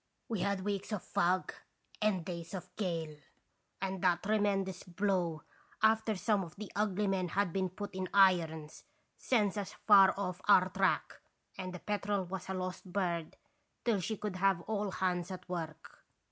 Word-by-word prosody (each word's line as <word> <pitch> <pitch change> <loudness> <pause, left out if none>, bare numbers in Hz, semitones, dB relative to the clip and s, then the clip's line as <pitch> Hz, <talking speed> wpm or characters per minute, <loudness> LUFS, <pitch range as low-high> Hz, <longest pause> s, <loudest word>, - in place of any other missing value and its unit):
We 225 -4 -2
had 200 0 0
weeks 200 +1 -2
of 210 -4 -2
fog 180 +2 +1 0.5
and 200 -5 +1
days 170 0 -5
of 180 0 -8
gale, 165 -6 -3 0.6
and 190 -1 -3
that 180 -2 +2
tremendous 195 -3 +1
blow, 180 -3 -1 0.4
after 220 0 +4
some 200 0 +1
of 165 - -10
the 210 0 -8
ugly 210 0 +1
men 190 -2 +1
had 190 +1 0
been 190 -1 0
put 205 +3 -7
in 185 0 -3
irons, 165 -6 +3 0.3
sends 210 -5 +1
us 200 -1 -4
far 195 -3 +8
off 185 -2 -3
our 190 -2 +6
track, - - 0 0.3
and 185 -1 -5
the 180 - -6
Petrel 205 0 -1
was 185 +1 -6
a 190 - -1
lost 185 0 -5
bird 175 -4 -1 0.5
till 225 -4 +3
she 215 +4 -2
could 205 -3 -4
have 190 -2 +3
all 210 +2 -2
hands 185 -1 -1
at 185 -1 -7
work. 165 -4 -6
190 Hz, 165 wpm, -33 LUFS, 180-205 Hz, 0.6 s, far